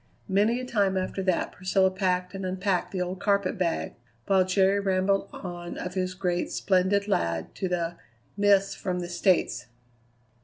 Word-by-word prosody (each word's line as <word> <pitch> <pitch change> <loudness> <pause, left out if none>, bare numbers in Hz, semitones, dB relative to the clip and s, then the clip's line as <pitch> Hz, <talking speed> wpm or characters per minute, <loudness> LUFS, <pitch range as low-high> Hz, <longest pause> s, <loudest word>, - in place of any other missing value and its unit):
Many 210 +5 +2
a 255 - -5
time 200 -6 +1
after 185 +1 -2
that 185 -2 0
Priscilla 190 +1 +1
packed 185 -1 -1
and 195 0 -5
unpacked 185 0 -1
the 185 -2 -1
old 180 +1 -5
carpet 200 -2 +1
bag, 175 -3 -1 0.3
while 190 -1 +4
Jerry 190 +2 +3
rambled 195 0 +1
on 175 -2 -7
of 180 - -5
his 185 -1 -2
great 180 -2 0
and - - -11
splendid 195 +2 +2
lad 85 - -1
to 190 - -3
the 170 -1 -2 0.4
"Miss 200 -1 +3
from 180 -2 -3
the 175 - -5
States." 180 +1 +1
185 Hz, 165 wpm, -27 LUFS, 180-195 Hz, 0.4 s, while